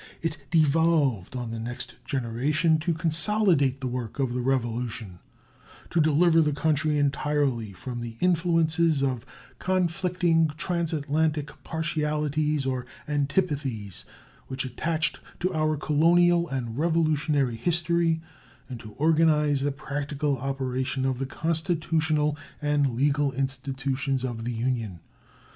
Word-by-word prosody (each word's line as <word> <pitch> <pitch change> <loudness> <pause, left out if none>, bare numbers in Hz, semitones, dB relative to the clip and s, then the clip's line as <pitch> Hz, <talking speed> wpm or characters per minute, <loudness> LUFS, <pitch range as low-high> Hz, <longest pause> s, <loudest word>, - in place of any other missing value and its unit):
It 165 -1 -1
devolved 155 - +2
on 120 -2 -4
the 115 - -4
next 120 +2 -5
generation 140 +6 +1
to 170 +3 0
consolidate 165 -4 +2
the 130 - -2
work 120 -3 -4
of 130 -3 0
the 125 - -1
Revolution, 120 -6 -2 0.7
to 170 - +3
deliver 160 +2 +4
the 150 -2 +1
country 150 0 +1
entirely 140 -5 0
from 120 +6 -6
the 115 -1 -7
influences 165 -3 +2
of 130 -2 -1 0.3
conflicting 180 -2 +1
transatlantic 155 -3 -1
partialities 150 -2 -1
or 130 -2 -2 0.2
antipathies 140 - -1 0.4
which 135 0 -3
attached 160 +6 -1 0.2
to 185 +1 -1
our 155 -1 +1
colonial 170 +3 +3
and 125 -2 -3
Revolutionary 155 -5 +1
history, 170 +3 +1 0.5
and 125 -3 -7
to 110 -1 -11
organize 150 -2 +3
the 145 +1 +1
practical 145 0 -2
operation 130 0 -2
of 130 -2 0
the 135 - -2
constitutional 160 -1 0 0.2
and 145 -4 +1
legal 140 +1 +1
institutions 135 0 -2
of 115 -2 -4
the 120 - -1
Union. 115 -6 -2
145 Hz, 115 wpm, -26 LUFS, 130-160 Hz, 0.7 s, deliver